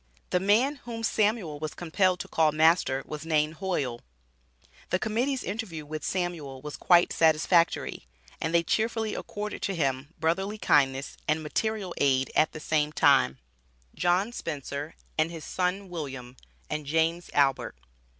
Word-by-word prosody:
The 180 - +3
man 225 +10 +3
whom 230 -3 -7
Samuel 210 -9 +1
was 155 0 -5
compelled 180 +2 +1
to - - -8
call 160 -1 +3
master 155 -3 +3
was 150 -1 -6
named 155 -1 +1
Hoyle. 145 -11 -2 0.9
The 185 - +2
Committee's 245 +7 -1
interview 185 -7 -5
with 155 0 -6
Samuel 170 -7 -3
was 150 +2 -7
quite 175 -1 +4
satisfactory, 165 - +2 0.3
and 160 - -1
they 170 0 +3
cheerfully 220 +4 0
accorded 210 0 -5
to 195 - -1
him 140 0 -1
brotherly 190 +6 0
kindness 135 -7 +2
and 155 +1 +1
material 205 +3 -2
aid 135 -1 +2
at 155 - +4
the 155 - -8
same 150 -1 0
time. 65 - +4 0.6
JOHN 180 +5 +1
SPENCER 145 - -5 0.2
AND 155 +1 +3
HIS 165 -2 -8
SON 185 +2 -1
WILLIAM, 135 -8 -6 0.3
AND 150 -1 -4
JAMES 165 +3 +1
ALBERT. 135 - +2
165 Hz, 145 wpm, -28 LUFS, 150-190 Hz, 0.9 s, quite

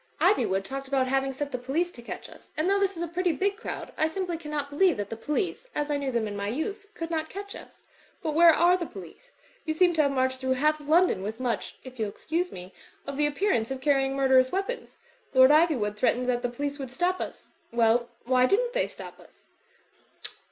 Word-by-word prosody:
Ivjrwood 195 - +3
talked 270 +6 -5
about 265 -1 +1
having 270 0 +1
set 285 +2 -4
the 250 - -3
police 305 +8 -1
to 240 - -10
catch 235 - -7
us; - - -16
and 310 +3 +1
though 400 +1 +3
this 395 -2 0
is 340 - -2
a - - -2
pretty 350 +1 0
big 400 +3 0
crowd, 455 - -6
I 315 - +3
simply 355 +1 -3
cannot 300 -3 -4
believe 355 +5 +3
that 205 0 -4
the - - -2
police, 300 - -2
as 295 0 -1
I 290 - +1
knew 275 -2 -2
them 235 -3 0
in 205 - -5
my 200 0 -3
youth, 390 - -3
could 330 -4 -5
not 315 -1 -1
catch 400 +1 -7
us. - - -13 0.4
But 310 -2 -1
where 335 +2 +8
are 345 +3 +4
the 345 -3 -3
police? 195 - -12 0.3
You 315 -1 -2
seem 355 +1 +4
to 320 - +3
have 280 -2 +2
marched 260 -1 0
through 260 0 +1
half 305 +3 +1
London 315 - +3
with 215 +4 -5
much 245 -3 -2
(if 255 -2 -11
you'll 215 -2 0
excuse 335 - -2
me) 180 +1 -9 0.3
of 280 - -5
the 295 +1 +3
appearance 290 - 0
of 265 -1 -4
car 285 +2 +3
rying 270 0 0
murderous 265 -1 +4
weapons. 390 +6 -3 0.4
Lord 260 +1 +8
Ivywood 295 -10 +3
threatened 250 +2 +1
that 245 -1 +1
the 245 - -1
police 285 +4 -4
would 270 -2 -5
stop 355 +8 0
us. - - -7 0.2
Well, 235 +1 +3 0.2
why 255 0 +4
didn't 480 - +1
they - - +1
stop - - -11
us?" - - -20
285 Hz, 230 wpm, -27 LUFS, 255-345 Hz, 0.4 s, where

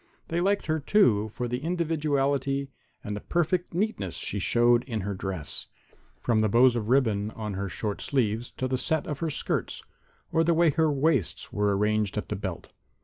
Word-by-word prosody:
They 170 +1 0
liked 200 +2 +1
her, 155 0 0
too, 120 - +3
for 120 +3 -4
the 125 +3 -3
individuality 140 -5 0 0.3
and 105 0 -6
perfect 175 0 0
neatness 170 - -1
she 100 +5 -3
showed 120 +4 +3
in 115 -5 -3
her 100 +2 -3
dress, 95 -5 -5 0.5
from 115 -3 +2
the 110 - +2
bows 120 +3 +5
of 110 -2 -2
ribbon 110 -6 +2
on 110 -2 -5
her 100 0 -3
short 105 +3 -4
sleeves 120 -3 0
to 130 - -2
the 130 0 -1
set 160 +3 0
of 145 -2 -4
her 165 - -1
skirts - - -2 0.5
or 165 - +3
the 165 0 +3
way 165 -1 +4
her 160 +1 +2
waists 140 - 0
were 105 -1 +1
arranged 105 0 +1
at - - -3
the - - -1
belt. - - -5
125 Hz, 185 wpm, -27 LUFS, 105-155 Hz, 0.5 s, bows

